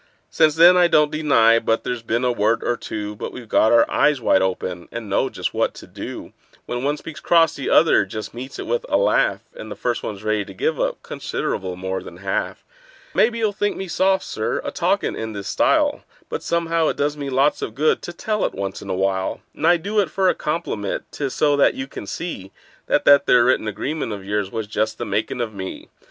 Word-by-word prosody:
Since 155 Hz, -2 st, +3 dB
then 170 Hz, +2 st, +8 dB
I 175 Hz, -1 st, +6 dB
don't 150 Hz, -3 st, +3 dB
deny 125 Hz, -7 st, +4 dB
but 115 Hz, 0 st, 0 dB
there's 125 Hz, -2 st, -3 dB
been 115 Hz, +2 st, -1 dB
a 125 Hz, -, +3 dB
word 115 Hz, 0 st, +1 dB
or 120 Hz, -, 0 dB
two; 105 Hz, -2 st, -5 dB
But -, -, -6 dB
we've 120 Hz, -3 st, -10 dB
got 110 Hz, +1 st, +3 dB
our 115 Hz, -1 st, +6 dB
eyes 150 Hz, -2 st, +2 dB
wide 110 Hz, -, +3 dB
open, 90 Hz, -2 st, -2 dB
and 115 Hz, -2 st, -6 dB
know -, -, +1 dB
just -, -, -4 dB
what -, -, 0 dB
to -, -, -11 dB
do: -, -, -8 dB, 0.3 s
When 120 Hz, +1 st, -4 dB
one 145 Hz, +2 st, 0 dB
speaks 155 Hz, -2 st, -9 dB
cross 165 Hz, +2 st, +4 dB
the 140 Hz, -, -4 dB
other 165 Hz, -, +5 dB
just 110 Hz, +2 st, -6 dB
meets 130 Hz, +3 st, -8 dB
it -, -, -5 dB
with 485 Hz, 0 st, -1 dB
a -, -, +3 dB
laugh, -, -, +2 dB
And -, -, -9 dB
the -, -, -6 dB
first 120 Hz, -1 st, -2 dB
one's 100 Hz, -1 st, -6 dB
ready 110 Hz, -1 st, 0 dB
to 95 Hz, -1 st, -12 dB
give 155 Hz, +9 st, -1 dB
up -, -, -2 dB
considerable 95 Hz, -1 st, -3 dB
more 95 Hz, +1 st, -4 dB
than -, -, -11 dB
half. -, -, -3 dB, 0.5 s
Maybe 230 Hz, +1 st, +3 dB
you'll 220 Hz, -2 st, +1 dB
think 205 Hz, +1 st, -1 dB
me 190 Hz, -, -5 dB
soft, 190 Hz, +3 st, +2 dB
Sir, 110 Hz, -, -2 dB
a -, -, -4 dB
talkin' -, -, 0 dB
in 110 Hz, 0 st, -5 dB
this 100 Hz, -1 st, -6 dB
style, -, -, +2 dB, 0.3 s
But -, -, -4 dB
somehow 165 Hz, -1 st, 0 dB
it -, -, -1 dB
does 145 Hz, +1 st, 0 dB
me 140 Hz, -2 st, -5 dB
lots 135 Hz, +3 st, +2 dB
of 110 Hz, -, -5 dB
good 155 Hz, +2 st, +2 dB
to -, -, -6 dB
tell 210 Hz, +5 st, -2 dB
it -, -, -1 dB
once 95 Hz, 0 st, -4 dB
in 100 Hz, -, -9 dB
a 95 Hz, -, 0 dB
while; 95 Hz, 0 st, -1 dB
And 160 Hz, -, -1 dB
I 175 Hz, 0 st, +6 dB
do 200 Hz, +6 st, -1 dB
it 195 Hz, -6 st, +1 dB
for 190 Hz, +3 st, +2 dB
a -, -, +3 dB
compliment—'tis 140 Hz, -, -3 dB
so 145 Hz, -1 st, +3 dB
that 140 Hz, -, +4 dB
you 130 Hz, -, -4 dB
can 120 Hz, -6 st, -9 dB
see 100 Hz, -, -6 dB, 0.4 s
That -, -, +1 dB
that 140 Hz, 0 st, +6 dB
there 120 Hz, -1 st, +5 dB
written 125 Hz, -3 st, +2 dB
agreement 115 Hz, +4 st, -3 dB
of 100 Hz, -2 st, -8 dB
yours 100 Hz, -1 st, -2 dB
was 110 Hz, -1 st, -3 dB
just 110 Hz, +1 st, -2 dB
the 120 Hz, -, -4 dB
makin' 110 Hz, +5 st, -2 dB
of 115 Hz, -3 st, -2 dB
me. 95 Hz, -1 st, -7 dB
125 Hz, 230 wpm, -21 LUFS, 105-160 Hz, 0.5 s, then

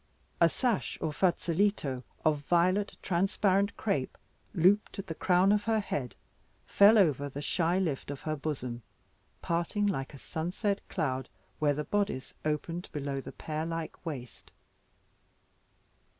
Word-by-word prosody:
A -, -, +6 dB
sash, 245 Hz, -6 st, -1 dB
or 155 Hz, -, -1 dB
fazoletto, 175 Hz, -5 st, +1 dB, 0.2 s
of 155 Hz, -2 st, +3 dB
violet 180 Hz, +7 st, +2 dB
transparent 195 Hz, +2 st, +1 dB
crape, 145 Hz, -12 st, -1 dB, 0.4 s
looped 190 Hz, +4 st, +3 dB
at 195 Hz, -, -4 dB
the 165 Hz, -, -4 dB
crown 180 Hz, +3 st, +3 dB
of 210 Hz, 0 st, +2 dB
her 225 Hz, -1 st, +2 dB
head, 135 Hz, -, -3 dB, 0.5 s
fell 205 Hz, +3 st, +6 dB
over 145 Hz, -7 st, +3 dB
the 140 Hz, -, -6 dB
shy 170 Hz, +4 st, +1 dB
lift 160 Hz, -10 st, -1 dB
of 145 Hz, -1 st, -5 dB
her 155 Hz, -1 st, -2 dB
bosom, 130 Hz, -5 st, -4 dB, 0.6 s
parting 170 Hz, +5 st, 0 dB
like 145 Hz, -8 st, -2 dB
a -, -, -9 dB
sunset 180 Hz, -, -2 dB
cloud, 130 Hz, -3 st, -2 dB, 0.3 s
where 145 Hz, -2 st, +2 dB
the 150 Hz, -, -2 dB
boddice 200 Hz, -8 st, -1 dB
opened 165 Hz, +3 st, -2 dB
below 140 Hz, -2 st, -3 dB
the -, -, -8 dB
pear 155 Hz, 0 st, -4 dB
like 165 Hz, -1 st, -5 dB
waist. 130 Hz, -, -7 dB
165 Hz, 135 wpm, -30 LUFS, 145-195 Hz, 0.6 s, A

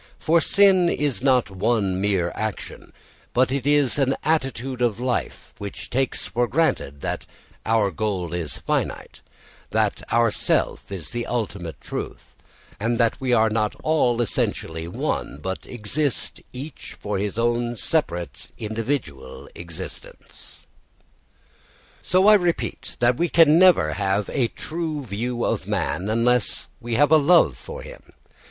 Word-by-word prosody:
For 165 Hz, +1 st, +3 dB
sin 190 Hz, -2 st, +5 dB
is 145 Hz, -6 st, -1 dB
not 130 Hz, -6 st, +3 dB
one 95 Hz, -1 st, 0 dB
mere 95 Hz, -4 st, +1 dB
action, 110 Hz, -2 st, -5 dB, 0.4 s
but 125 Hz, +1 st, +3 dB
it 140 Hz, 0 st, -1 dB
is 145 Hz, -1 st, +3 dB
an 135 Hz, -1 st, +2 dB
attitude 135 Hz, -5 st, -1 dB
of 115 Hz, -3 st, +1 dB
life 125 Hz, 0 st, -3 dB
which 100 Hz, -1 st, -7 dB
takes 135 Hz, +1 st, 0 dB
for 120 Hz, +1 st, 0 dB
granted 95 Hz, -, 0 dB
that -, -, -3 dB, 0.4 s
our 110 Hz, -3 st, +3 dB
goal 90 Hz, -2 st, -2 dB
is 85 Hz, -4 st, -3 dB
finite, -, -, -3 dB, 0.5 s
that -, -, +1 dB
our 115 Hz, -1 st, +4 dB
self -, -, 0 dB
is 85 Hz, -7 st, -6 dB
the 120 Hz, 0 st, -3 dB
ultimate 100 Hz, -8 st, -3 dB
truth, -, -, -7 dB, 0.5 s
and 115 Hz, +3 st, 0 dB
that 115 Hz, +1 st, +1 dB
we 130 Hz, -1 st, 0 dB
are 110 Hz, -2 st, +4 dB
not 110 Hz, -1 st, 0 dB
all 125 Hz, -7 st, +2 dB
essentially 80 Hz, -6 st, -2 dB
one 85 Hz, -, -3 dB
but 95 Hz, +4 st, -5 dB
exist 125 Hz, +5 st, -2 dB
each 135 Hz, +4 st, -8 dB
for 100 Hz, -2 st, -2 dB
his 105 Hz, +1 st, -3 dB
own 120 Hz, +1 st, 0 dB
separate 85 Hz, -, -1 dB
individual 110 Hz, -, -4 dB
existence. 85 Hz, -2 st, -9 dB, 1.4 s
So 185 Hz, +2 st, +3 dB
I 215 Hz, -, +9 dB
repeat 175 Hz, -5 st, 0 dB, 0.2 s
we 175 Hz, 0 st, +1 dB, 0.2 s
never 160 Hz, -, +6 dB
can -, -, -2 dB
have 100 Hz, 0 st, 0 dB
a 125 Hz, -4 st, +2 dB
true 155 Hz, +1 st, -4 dB
view 120 Hz, +2 st, -2 dB
of -, -, -1 dB
man 95 Hz, +3 st, -1 dB
unless 115 Hz, +1 st, +1 dB
we 120 Hz, -1 st, -3 dB
have 145 Hz, +4 st, +4 dB
a 160 Hz, -, +8 dB
love 165 Hz, +4 st, +5 dB
for 485 Hz, +1 st, -8 dB
him. -, -, -10 dB
120 Hz, 140 wpm, -23 LUFS, 100-145 Hz, 1.4 s, I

